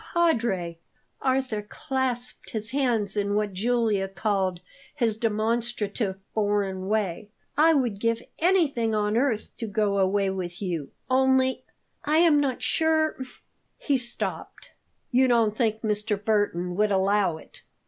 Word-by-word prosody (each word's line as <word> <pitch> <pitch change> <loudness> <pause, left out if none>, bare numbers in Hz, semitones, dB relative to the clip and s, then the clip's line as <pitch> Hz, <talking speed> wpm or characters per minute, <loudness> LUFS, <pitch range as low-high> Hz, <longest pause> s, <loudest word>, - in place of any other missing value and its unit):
"Padre!" 225 - +1 0.4
Arthur 260 -5 0
clasped 250 +3 -3
his 220 0 -3
hands 235 -7 0
in 205 0 0
what 210 -1 0
Julia 220 -1 +1
called 190 -1 -1 0.4
his 235 -6 +1
"demonstrative 220 -2 -1 0.2
foreign 200 -3 0
way." 205 -1 -1 0.3
"I 320 +2 +5
would 240 -8 0
give 230 +2 0 0.2
anything 300 - +2
on 210 0 0
earth 235 -3 0
to 230 - -3
go 205 -1 0
away 195 +1 +2
with 180 -2 -5
you. 170 -8 -3 0.2
Only 260 0 +2 0.4
I 305 +2 +2
am 325 -3 +5
not 270 -3 -1
sure 320 -1 +2 0.3
" - - -47 0.3
He 285 - 0
stopped. 240 -1 -5 0.4
"You 260 +1 +4
don't 230 -4 +3
think 220 -2 0
Mr. 210 0 0
Burton 180 -5 0
would 210 0 +3
allow 195 -3 +2
it?" - - -14
220 Hz, 135 wpm, -26 LUFS, 200-255 Hz, 0.4 s, I